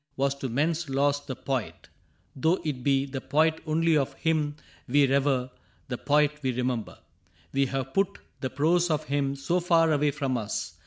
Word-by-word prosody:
Was 135 0 +2
to 135 - -3
men's 155 +5 0
loss 140 +1 +2
the 135 -2 -7
Poet 130 -2 -4 0.3
— - - -40
though 160 +7 +2
it 135 -5 -3
be 135 0 +2
The 135 -1 -5
Poet 160 +3 +2
only 165 +1 +2
of 140 -3 +1
him 155 -2 0 0.3
we 140 +3 +4
revere. 135 -2 +1 0.4
The 125 - -2
Poet 150 +1 +2
we 130 -2 0
remember. 125 -2 -2 0.6
We 135 0 +2
have 135 0 -3
put 195 -1 +1 0.2
The 130 - -2
prose 170 +6 +2
of 155 -1 0
him 140 -2 -1
so 170 +6 0
far 165 -2 +3
away 150 0 +2
from 135 -3 -1
us. 105 -1 -4
140 Hz, 180 wpm, -27 LUFS, 135-155 Hz, 0.6 s, we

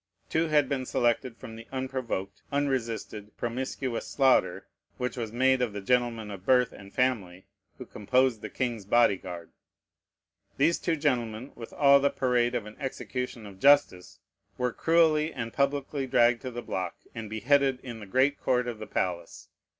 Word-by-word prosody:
Two 165 +1 +1
had 150 -3 +3
been 135 -1 -2
selected 120 0 0
from 110 - -10
the 115 +1 -11
unprovoked, 130 -7 -4
unresisted, 115 -7 -3
promiscuous 125 0 -3
slaughter 135 -2 +2 0.3
which 125 0 -3
was 115 -4 -4
made 130 +2 +3
of 120 -4 -1
the 105 - -4
gentlemen 115 -1 0
of 95 -2 -8
birth 125 +1 +3
and 100 0 -12
family 100 -9 -1 0.3
who - - -8
composed 125 +2 +1
the - - -6
king's 120 -5 -3
body 110 0 +4
guard. 90 -3 -9 1.1
These 155 +5 +3
two 170 - 0
gentlemen, 125 -5 -1
with 115 -1 -10
all 140 -1 +5
the 140 +1 +2
parade 125 -2 +1
of 110 - -2
an 105 0 -11
execution 125 -3 -5
of 100 -2 -12
justice, 140 -10 +3 0.4
were 125 -1 -1
cruelly 160 -1 +3
and 115 -5 -5
publicly 140 0 -1
dragged 120 -2 +3
to 130 - -5
the 120 -1 -6
block, 90 -2 -3 0.2
and 115 -3 -6
beheaded 135 +4 +2
in 120 -3 -7
the 105 - -10
great 130 +7 +2
court 125 -1 +1
of 115 -3 -5
the 110 - -7
palace. 85 -2 -3
125 Hz, 165 wpm, -28 LUFS, 110-135 Hz, 1.1 s, all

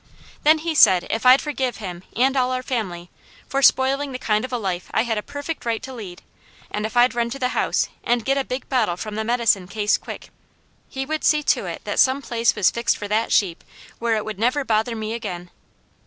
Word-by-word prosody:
Then 310 +2 +5
he 325 +1 -3
said 185 - +6
if 225 +3 0
I'd 255 +2 +7
forgive 265 -5 -2
him 180 -5 -7
and 265 +3 +2
all 255 -1 +1
our 255 0 -2
family, 185 -9 -4 0.4
for 275 - -1
spoiling 275 +1 +3
the - - -3
kind 215 -3 0
of 255 - -5
a 245 - -1
life 185 -5 -3
I 220 - +3
had 225 -3 -1
a - - -4
perfect 285 +6 -6
right 230 -2 -2
to 265 - -7
lead, 200 -7 -9 0.5
and 210 +1 -2
if 225 - -7
I'd 245 +1 +5
run 235 0 0
to 265 - -5
the 250 -2 0
house - - 0 0.2
and 240 -2 0
get 275 - +2
a 275 - 0
big 255 +1 -5
bottle 220 -10 0
from 215 +2 -6
the 220 +1 -2
medicine 230 -5 +1
case 205 +1 0
quick, - - -9 0.6
he 270 0 -4
would 310 +2 -3
see 300 -1 +3
to - - +1
it - - -6
that - - -3
some 270 +1 +3
place 235 -2 +1
was 205 -4 +3
fixed 235 0 0
for 205 - -5
that 220 +2 0
sheep 180 -5 +1 0.4
where 230 -1 +1
it 215 - -2
would 215 -3 -6
never 255 +5 +1
bother 225 +1 0
me 220 0 -4
again. 180 -7 -6
235 Hz, 230 wpm, -22 LUFS, 210-265 Hz, 0.6 s, I'd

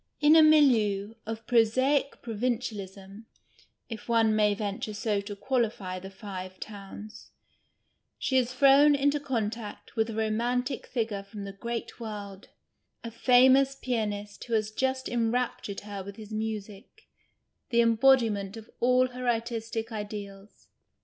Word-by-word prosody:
In 300 +1 +6
a 320 - +9
milieu 225 -10 +4
of 225 0 -5
prosaic 255 +5 +2
provincialism 215 -3 -4 0.6
(if 225 0 -8
one 225 -2 +3
may 210 -1 +3
venture 205 +1 -4
so 205 -1 -1
to 205 0 -7
qualify 210 -5 -2
the 190 +1 -9
Five 185 -2 -8
Towns) 210 0 -10 0.9
she 265 - -1
is 250 -1 +2
thrown 275 +3 +6
into 285 +1 +1
contact 225 -6 -4
with 220 0 +1
a 225 - -5
romantic 235 +4 -1
figure 220 -5 -2
from 200 +1 -9
the 200 0 -7
great 235 +5 -5
world, 205 -3 -8 0.5
a 230 - -6
famous 260 +3 +5
pianist 210 -5 -3
who 235 - -5
has 215 -1 0
just 260 +3 -1
enraptured 235 -3 -1
her 205 -1 -7
with 200 +1 -9
his 215 0 -10
music, 215 - -6 0.6
the 235 -1 +4
embodiment 230 -4 +3
of 220 0 -12
all 255 +1 +3
her 250 0 -3
artistic 230 -1 -2
ideals. 205 -1 -8
225 Hz, 135 wpm, -28 LUFS, 205-250 Hz, 0.9 s, a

